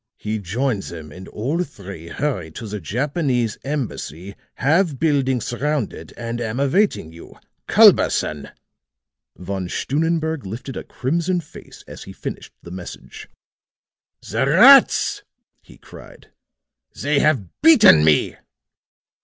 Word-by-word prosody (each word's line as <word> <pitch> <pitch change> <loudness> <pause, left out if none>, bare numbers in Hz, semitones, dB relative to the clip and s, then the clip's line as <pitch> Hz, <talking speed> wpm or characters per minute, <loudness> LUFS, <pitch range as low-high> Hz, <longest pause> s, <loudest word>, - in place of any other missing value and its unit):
He 110 0 -4
joined 110 +4 -2
them 80 -5 -9
and 90 +4 -11
all 145 +11 -2
three 100 - -11
hurried 90 - -4
to - - -7
the 105 0 -5
Japanese 125 - -2
Embassy. 100 - -5 0.2
Have 160 +2 +1
building 135 -4 +1
surrounded 120 - -3
and 120 0 -5
am 115 +2 -3
awaiting 140 - 0
you. 85 - -14 0.3
"CULBERSON." 75 -2 +4 0.9
Von 95 0 -5
Stunnenberg 160 - -1
lifted 115 +7 -7
a - - -5
crimson 170 +7 -2
face 150 - -13
as - - -10
he - - -10
finished - - -7
the 85 - -11
message. 90 -1 -10 1.0
"The - - 0
rats!" - - +6 0.4
he - - -18
cried. - - -15 0.7
"They 145 0 +1
have 135 - 0
beaten 230 - +7
me!" 75 -1 +2
120 Hz, 120 wpm, -21 LUFS, 95-150 Hz, 1.0 s, beaten